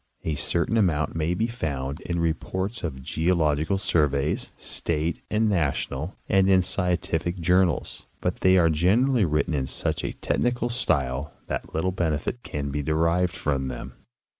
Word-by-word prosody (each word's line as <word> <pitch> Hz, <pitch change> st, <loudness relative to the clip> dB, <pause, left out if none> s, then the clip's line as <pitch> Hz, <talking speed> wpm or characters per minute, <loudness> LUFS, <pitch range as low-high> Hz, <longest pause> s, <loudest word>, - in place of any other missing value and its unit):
A 80 Hz, -, -1 dB
certain 85 Hz, +9 st, 0 dB
amount 80 Hz, -8 st, +2 dB
may 80 Hz, +2 st, 0 dB
be 110 Hz, -, +1 dB
found 70 Hz, -, -3 dB
in 85 Hz, -, -3 dB
reports 95 Hz, +6 st, -2 dB
of 65 Hz, -6 st, -4 dB
geological 80 Hz, +2 st, +1 dB
surveys, 75 Hz, -7 st, +1 dB
state 80 Hz, 0 st, -2 dB
and 110 Hz, +1 st, +2 dB
national, 80 Hz, -3 st, -1 dB
and 95 Hz, 0 st, +4 dB
in 95 Hz, -1 st, +6 dB
scien 90 Hz, -1 st, +1 dB
tific 85 Hz, +2 st, -2 dB
journals, 90 Hz, +1 st, +1 dB
but -, -, -1 dB
they 95 Hz, 0 st, +4 dB
are 85 Hz, -2 st, +4 dB
generally 105 Hz, -, +3 dB
written 75 Hz, 0 st, 0 dB
in 65 Hz, -3 st, -1 dB
such -, -, -1 dB
a -, -, -2 dB
technical 120 Hz, 0 st, 0 dB
style 70 Hz, -, 0 dB
that -, -, -5 dB
little 95 Hz, +4 st, +1 dB
benefit 85 Hz, +5 st, -1 dB
can 70 Hz, -7 st, -4 dB
be 75 Hz, +1 st, -1 dB
derived 85 Hz, +5 st, +1 dB
from 70 Hz, -6 st, -1 dB
them. 65 Hz, 0 st, -6 dB
85 Hz, 155 wpm, -25 LUFS, 75-95 Hz, -, in